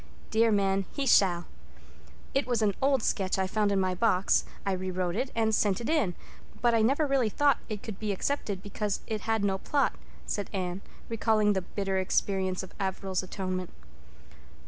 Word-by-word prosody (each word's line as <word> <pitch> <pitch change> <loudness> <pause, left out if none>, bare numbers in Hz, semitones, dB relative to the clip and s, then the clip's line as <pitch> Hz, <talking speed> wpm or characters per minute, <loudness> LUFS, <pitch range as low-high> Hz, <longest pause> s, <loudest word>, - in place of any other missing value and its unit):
Dear 225 +1 +4
man, 195 -1 +2
he 280 - -2
shall. 180 -8 +4 0.9
It 275 0 +1
was 240 -3 +1
an 205 -2 +3
old 270 -3 +3
sketch 190 -2 0
I 190 - +1
found 205 +2 +1
in 200 - +2
my 185 -1 +1
box. 185 -1 +2 0.2
I 195 - +1
re 185 0 -2
wrote 180 -1 -1
it 255 +4 -1
and 220 -1 +2
sent 205 -3 +2
it 235 - -4
in—but 240 - -1
I 225 - +4
never 275 +7 +3
really 270 -5 +2
thought 285 +4 +3
it 210 -2 -5
could 215 -4 -7
be 215 -1 -1
accepted 200 -2 -2
because 205 0 -2
it 215 -1 -3
had 225 -2 0
no 195 -1 +1
plot," 285 +6 +1 0.3
said 205 - -3
Anne, 185 -1 -2 0.3
recalling 220 -2 +2
the 190 - 0
bitter 195 0 -2
experience 190 0 0
of 190 - -11
Averil's 190 -1 -1
Atonement. 185 -1 -4
200 Hz, 180 wpm, -29 LUFS, 190-225 Hz, 0.9 s, Dear